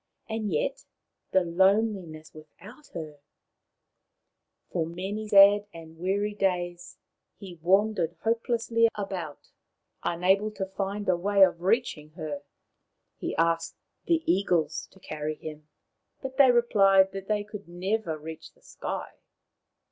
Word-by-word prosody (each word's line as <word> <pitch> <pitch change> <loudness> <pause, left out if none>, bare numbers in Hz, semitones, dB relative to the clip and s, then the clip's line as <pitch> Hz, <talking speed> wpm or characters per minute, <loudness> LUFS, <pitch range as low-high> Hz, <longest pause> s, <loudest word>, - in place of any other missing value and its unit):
And 220 -3 -3
yet, 150 - -1 0.5
the 190 - +3
loneliness 185 -2 +1
without 170 - -14
her! 155 -3 -7 1.5
For 170 - 0
many 190 +6 -5
sad 205 0 +7
and 160 -1 -12
weary 200 +4 0
days 175 -3 -2 0.4
he 180 -4 -11
wandered 185 -1 +2
hopelessly 230 0 +2
about, 185 -7 -6 0.5
unable 190 +5 +2
to 195 -2 -3
find 195 +1 -4
away 195 +2 +4
of 175 -2 +3
reaching 180 -7 0
her. 155 -3 -5 0.8
He - - -3
asked 165 0 0 0.3
the 330 -2 +2
eagles 170 -4 +1
to 190 - -20
carry 155 -2 -4
him, 155 -1 -9 0.5
but 265 -1 -7
they 275 -2 +7
replied 195 -5 +5
that 195 0 -7
they 210 -1 0
could 210 -2 -10
never 180 -1 -2
reach 160 +1 -9
the - - -30
sky. - - -6
190 Hz, 120 wpm, -27 LUFS, 165-210 Hz, 1.5 s, sad